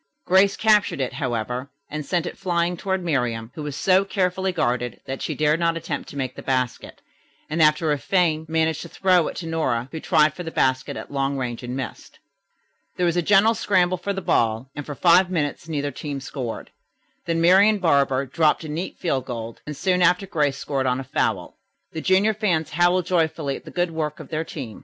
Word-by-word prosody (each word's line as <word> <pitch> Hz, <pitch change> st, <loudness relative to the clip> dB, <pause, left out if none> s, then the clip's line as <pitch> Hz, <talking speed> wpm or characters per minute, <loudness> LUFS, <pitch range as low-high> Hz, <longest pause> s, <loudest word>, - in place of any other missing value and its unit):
Grace 190 Hz, +2 st, +4 dB
captured 210 Hz, -7 st, +3 dB
it, 130 Hz, -, -2 dB
however, 125 Hz, -1 st, -3 dB, 0.2 s
and 155 Hz, +1 st, -5 dB
sent 175 Hz, +3 st, -1 dB
it -, -, -5 dB
flying 175 Hz, -2 st, 0 dB
toward 190 Hz, +1 st, -2 dB
Miriam, 125 Hz, -8 st, -1 dB
who 155 Hz, -, -7 dB
was 145 Hz, -2 st, -5 dB
so 190 Hz, +5 st, +3 dB
carefully 190 Hz, -1 st, 0 dB
guarded 125 Hz, -8 st, -1 dB
that 135 Hz, 0 st, -5 dB
she 155 Hz, -, -3 dB
dared 150 Hz, +2 st, +2 dB
not 165 Hz, -1 st, +1 dB
attempt 150 Hz, -3 st, -5 dB
to 145 Hz, -, -9 dB
make 130 Hz, -2 st, -2 dB
the -, -, -8 dB
basket, 130 Hz, -2 st, -2 dB, 0.5 s
and 165 Hz, +2 st, 0 dB
after 155 Hz, 0 st, +4 dB
a 145 Hz, -, 0 dB
feint 160 Hz, +2 st, +1 dB
managed 160 Hz, -1 st, +1 dB
to -, -, -8 dB
throw 185 Hz, -3 st, +3 dB
it -, -, -5 dB
to 170 Hz, -, -6 dB
Nora, 135 Hz, -7 st, -1 dB
who 160 Hz, -, -5 dB
tried 155 Hz, -1 st, +3 dB
for 180 Hz, -, -8 dB
the 165 Hz, -, -5 dB
basket 130 Hz, -4 st, 0 dB
at -, -, -8 dB
long 140 Hz, 0 st, -1 dB
range 120 Hz, -3 st, -3 dB
and 125 Hz, 0 st, -5 dB
missed. 130 Hz, -5 st, -7 dB, 0.8 s
There 180 Hz, -, +1 dB
was 170 Hz, -1 st, +1 dB
a 175 Hz, -, +2 dB
general 205 Hz, +5 st, +5 dB
scramble 185 Hz, -4 st, +1 dB
for 200 Hz, +3 st, -3 dB
the 195 Hz, -1 st, -4 dB
ball, 115 Hz, +3 st, +1 dB
and 145 Hz, -, -6 dB
for 145 Hz, -, -5 dB
five 180 Hz, +3 st, +5 dB
minutes 155 Hz, -2 st, -2 dB
neither 145 Hz, -2 st, -2 dB
team 145 Hz, -2 st, -5 dB
scored; 130 Hz, -3 st, -6 dB, 0.6 s
then 165 Hz, -1 st, 0 dB
Marian 195 Hz, +5 st, +5 dB
Barber 140 Hz, -7 st, +2 dB
dropped 155 Hz, +4 st, +1 dB
a 155 Hz, -, -7 dB
neat 165 Hz, +5 st, -4 dB
field 135 Hz, -8 st, -1 dB
goal, 115 Hz, -2 st, -5 dB
and 150 Hz, -2 st, -5 dB
soon 180 Hz, -1 st, +1 dB
after 180 Hz, +2 st, +3 dB
Grace 150 Hz, -7 st, 0 dB
scored 135 Hz, -2 st, -2 dB
on 125 Hz, 0 st, +1 dB
a -, -, -4 dB
foul. -, -, -2 dB, 0.3 s
The 160 Hz, -, -5 dB
junior 195 Hz, +5 st, +3 dB
fans 180 Hz, -8 st, 0 dB
howled 175 Hz, +2 st, +2 dB
joyfully 160 Hz, -5 st, 0 dB
at -, -, -11 dB
the -, -, -9 dB
good 175 Hz, -1 st, -1 dB
work 155 Hz, -2 st, -3 dB
of -, -, -10 dB
their 160 Hz, 0 st, -2 dB
team. 135 Hz, -9 st, -7 dB
160 Hz, 210 wpm, -23 LUFS, 135-180 Hz, 0.8 s, general